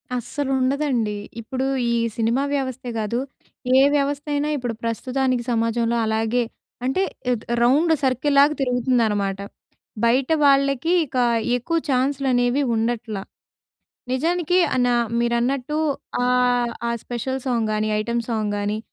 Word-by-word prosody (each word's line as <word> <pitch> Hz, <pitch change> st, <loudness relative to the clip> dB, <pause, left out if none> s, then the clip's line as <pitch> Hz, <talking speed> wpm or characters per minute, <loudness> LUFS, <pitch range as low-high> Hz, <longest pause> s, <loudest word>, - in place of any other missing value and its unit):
అస్సలు 270 Hz, +3 st, -3 dB
ఉండదండి. 255 Hz, -5 st, 0 dB, 0.3 s
ఇప్పుడు 260 Hz, +3 st, -3 dB, 0.3 s
ఈ -, -, +2 dB, 0.2 s
సినిమా 230 Hz, +4 st, +1 dB
వ్యవస్థే 260 Hz, -2 st, -3 dB
కాదు, 220 Hz, +3 st, -1 dB, 0.6 s
ఏ -, -, +7 dB, 0.2 s
వ్యవస్థ 285 Hz, 0 st, 0 dB
అయినా 290 Hz, +1 st, 0 dB
ఇప్పుడు 245 Hz, -3 st, -3 dB
ప్రస్తుతానికి 255 Hz, +2 st, -1 dB
సమాజంలో 230 Hz, 0 st, +1 dB
అలాగే 225 Hz, +2 st, +1 dB, 0.4 s
అంటే 270 Hz, +9 st, +1 dB, 0.3 s
ఆహ్, 240 Hz, -3 st, 0 dB, 0.2 s
రౌండ్ 300 Hz, +7 st, +4 dB
సర్కిల్ 265 Hz, +2 st, +1 dB
లాగా 295 Hz, +2 st, +5 dB
తిరుగుతుందన్నమాట. 230 Hz, -6 st, +1 dB, 0.6 s
బయట 255 Hz, +5 st, +2 dB
వాళ్ళకి 275 Hz, +2 st, +3 dB
ఇక 255 Hz, -, -6 dB, 0.4 s
ఎక్కువ 330 Hz, +8 st, -1 dB
ఛాన్స్‌లనేవి 265 Hz, -1 st, +1 dB
ఉండట్లా. 225 Hz, -2 st, -2 dB, 0.9 s
నిజానికి 345 Hz, +5 st, +1 dB, 0.2 s
అన 245 Hz, -1 st, +2 dB, 0.3 s
మీరన్నట్టు 245 Hz, +4 st, 0 dB, 0.5 s
ఆహ్, 245 Hz, -1 st, +2 dB, 0.2 s
ఆ! -, -, 0 dB
స్పెషల్ 260 Hz, +2 st, -3 dB
సాంగ్ 235 Hz, -4 st, 0 dB
గానీ, 215 Hz, 0 st, 0 dB
ఐటెమ్ 235 Hz, +2 st, -1 dB
సాంగ్ 215 Hz, -3 st, -1 dB
గానీ 205 Hz, +1 st, -1 dB
250 Hz, 115 wpm, -22 LUFS, 230-275 Hz, 0.9 s, ఏ